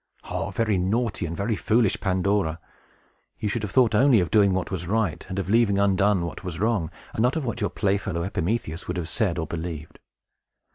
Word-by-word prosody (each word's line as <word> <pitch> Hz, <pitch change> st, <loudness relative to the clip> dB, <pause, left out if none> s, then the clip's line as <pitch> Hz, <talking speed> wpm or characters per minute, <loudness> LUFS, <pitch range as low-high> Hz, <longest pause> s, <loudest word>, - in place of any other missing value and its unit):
Oh, -, -, -2 dB
very 110 Hz, -4 st, 0 dB
naughty 100 Hz, 0 st, 0 dB
and 85 Hz, +1 st, -5 dB
very 105 Hz, +3 st, 0 dB
foolish 110 Hz, +1 st, +2 dB
Pandora! 95 Hz, -3 st, 0 dB, 0.8 s
You 105 Hz, -, -2 dB
should 115 Hz, -, -2 dB
have 105 Hz, -, -3 dB
thought 120 Hz, 0 st, +3 dB
only 125 Hz, +1 st, +5 dB
of 90 Hz, -2 st, -1 dB
doing 100 Hz, -3 st, +5 dB
what 95 Hz, +1 st, -2 dB
was 90 Hz, -2 st, -4 dB
right, 105 Hz, -4 st, 0 dB
and 95 Hz, -, -4 dB
of 95 Hz, -, -2 dB
leaving 105 Hz, -1 st, +3 dB
undone 100 Hz, -2 st, +2 dB
what 85 Hz, -, -7 dB
was 85 Hz, -3 st, -5 dB
wrong, 105 Hz, -6 st, +1 dB, 0.2 s
and -, -, -1 dB
not 125 Hz, +5 st, +2 dB
of 160 Hz, -4 st, -2 dB
what 120 Hz, -1 st, -3 dB
your 105 Hz, -, +1 dB
playfellow 100 Hz, -3 st, -1 dB
Epimetheus 90 Hz, -2 st, -2 dB
would 90 Hz, -, -3 dB
have 85 Hz, -3 st, -3 dB
said 90 Hz, 0 st, 0 dB
or 80 Hz, -, -1 dB
believed. 80 Hz, -1 st, -6 dB
100 Hz, 200 wpm, -25 LUFS, 90-110 Hz, 0.8 s, only